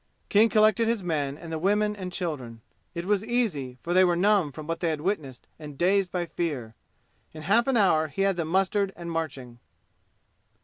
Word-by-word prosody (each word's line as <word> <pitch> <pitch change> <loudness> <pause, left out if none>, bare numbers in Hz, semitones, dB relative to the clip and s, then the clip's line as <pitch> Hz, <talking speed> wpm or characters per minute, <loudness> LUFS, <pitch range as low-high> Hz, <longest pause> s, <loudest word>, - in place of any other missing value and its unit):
King 215 +3 +5
collected 220 +1 +3
his 230 -4 0
men 145 -5 -2
and 165 0 -10
the 160 - -3
women 210 +4 +1
and 185 -3 -6
children. 135 -11 -5 0.3
It 170 +1 -4
was 205 0 +1
easy, 195 - -1
for 175 - -2
they 185 +1 +6
were 175 -1 +3
numb 190 -4 +2
from 155 +2 -9
what 165 +1 -3
they 170 - 0
had 155 -2 -2
witnessed 155 -9 -3
and 150 -3 -9
dazed 190 +2 +2
by 175 -1 -2
fear. 145 -10 -4 0.6
In 155 -1 -9
half 225 - +3
an 265 -3 +2
hour 160 -7 +3
he 195 +6 -2
had 195 -1 +2
them 170 -2 -2
mustered 195 +3 +1
and 170 -1 -7
marching. 140 -7 -5
175 Hz, 195 wpm, -26 LUFS, 155-200 Hz, 0.6 s, they